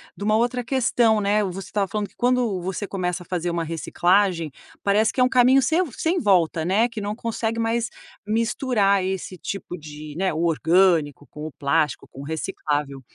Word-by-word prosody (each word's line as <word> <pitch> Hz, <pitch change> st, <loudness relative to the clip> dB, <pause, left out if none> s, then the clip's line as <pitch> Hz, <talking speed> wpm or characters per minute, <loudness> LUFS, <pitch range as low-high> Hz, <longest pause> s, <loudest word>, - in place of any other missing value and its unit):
de -, -, -7 dB
uma 215 Hz, +1 st, +2 dB
outra 245 Hz, +2 st, 0 dB
questão, 230 Hz, -3 st, +2 dB
né, 205 Hz, +1 st, +2 dB
você 195 Hz, 0 st, -5 dB
estava 200 Hz, -2 st, -1 dB
falando 210 Hz, +1 st, -3 dB
que -, -, -29 dB
quando 245 Hz, -6 st, +1 dB
você 190 Hz, +3 st, -4 dB
começa 180 Hz, -2 st, -3 dB
a -, -, -20 dB
fazer 175 Hz, -1 st, -2 dB
uma 170 Hz, -1 st, -1 dB
reciclagem, 170 Hz, +1 st, +1 dB, 0.3 s
parece 210 Hz, +2 st, +3 dB
que -, -, -5 dB
é -, -, +6 dB
um 250 Hz, -, +3 dB
caminho 255 Hz, +1 st, +5 dB
sem 315 Hz, +7 st, +2 dB
a -, -, +4 dB
v 320 Hz, -, -7 dB
sem 345 Hz, +3 st, +1 dB
volta, 175 Hz, -, +2 dB
né, 205 Hz, +7 st, +3 dB
que 225 Hz, -2 st, -6 dB
não 205 Hz, +1 st, -3 dB
consegue 230 Hz, 0 st, -3 dB
mais 230 Hz, +1 st, 0 dB, 0.4 s
misturar 220 Hz, -3 st, +1 dB
esse 190 Hz, 0 st, -4 dB
tipo 180 Hz, -1 st, -6 dB
de, 150 Hz, -1 st, -10 dB
né, 190 Hz, -1 st, 0 dB
o 160 Hz, +2 st, -1 dB
orgânico 165 Hz, -3 st, +2 dB
com 150 Hz, 0 st, -8 dB
o -, -, -8 dB
plástico, 150 Hz, +2 st, 0 dB
com 135 Hz, -, -10 dB
o -, -, -7 dB
reciclável. 150 Hz, -3 st, -3 dB
195 Hz, 200 wpm, -23 LUFS, 170-225 Hz, 0.4 s, é